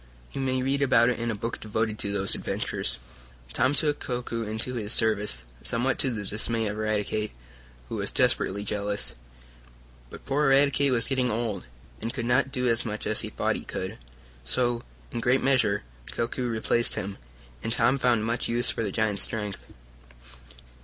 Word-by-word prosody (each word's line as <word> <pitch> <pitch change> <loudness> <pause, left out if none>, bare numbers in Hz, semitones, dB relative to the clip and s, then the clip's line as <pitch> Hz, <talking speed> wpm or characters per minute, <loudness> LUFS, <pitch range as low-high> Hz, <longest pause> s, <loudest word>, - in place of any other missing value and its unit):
You 135 - -4
may 130 -1 0
read 140 +2 +1
about 125 -3 +5
it 125 - -1
in 115 0 -1
a 115 - -1
book 115 +3 -4
devoted 110 0 -1
to 100 - -2
those 100 -1 +4
adventures. - - -2 0.6
Tom 130 +4 +2
took 150 -1 +1
Koku 120 -2 -3
into 110 +3 -3
his 110 -2 0
service, 105 - +2 0.2
somewhat 125 +2 0
to 130 - +3
the 105 -4 -4
dismay 115 +2 0
of 105 0 -2
Eradicate, 110 0 -1 0.5
who - - -4
was - - -1
desperately 100 +2 +2
jealous. 105 0 -1 1.0
But - - -11
poor 145 +2 +2
Eradicate 140 0 +5
was 120 -2 +3
getting 130 -2 +1
old, 110 -4 -2 0.4
and 115 - -2
could 120 - -4
not 130 +3 +2
do 125 -1 0
as 115 -1 +2
much 105 -1 -4
as 110 - 0
he - - -4
thought - - 0
he - - -8
could. - - -5 0.4
So, 120 - +1 0.3
in - - -3
a - - -3
great 125 +3 +3
measure, 120 -7 +3 0.3
Koku 120 +2 -2
replaced 115 +1 +1
him, 100 +2 -4 0.4
and 115 - -3
Tom 130 +3 +3
found 120 -4 +3
much 115 +2 0
use 120 +1 +4
for - - -3
the 105 -3 -1
giant's 105 -2 0
strength. 105 -3 -2
115 Hz, 180 wpm, -27 LUFS, 105-125 Hz, 1.0 s, about